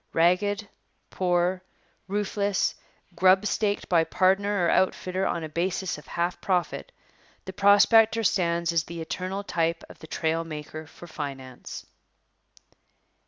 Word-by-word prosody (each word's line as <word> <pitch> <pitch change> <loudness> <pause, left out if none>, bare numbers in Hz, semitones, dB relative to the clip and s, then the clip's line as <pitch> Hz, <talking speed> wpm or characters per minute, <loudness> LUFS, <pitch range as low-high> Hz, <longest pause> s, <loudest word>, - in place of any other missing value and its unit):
Ragged, 200 +5 +2 0.4
poor, 180 0 +1 0.5
roofless, 200 0 0 0.4
grubstaked 200 +3 +2
by 170 -2 +4
'pardner' 190 +2 +2
or - - +2
outfitter 185 0 +1
on 170 - -2
a - - -3
basis 175 +1 -2
of - - -17
half 175 +1 -2
profit, 180 -5 -1 0.5
the 190 - -7
prospector 220 +3 +5
stands 170 -3 +1
as 165 -2 +1
the 170 0 -7
eternal 185 +4 -4
type 165 -3 -1
of - - -14
the 160 - -11
trail 160 +1 -1
maker 155 0 -8
for 175 - -13
finance. 135 -5 -7
180 Hz, 120 wpm, -26 LUFS, 165-195 Hz, 0.5 s, prospector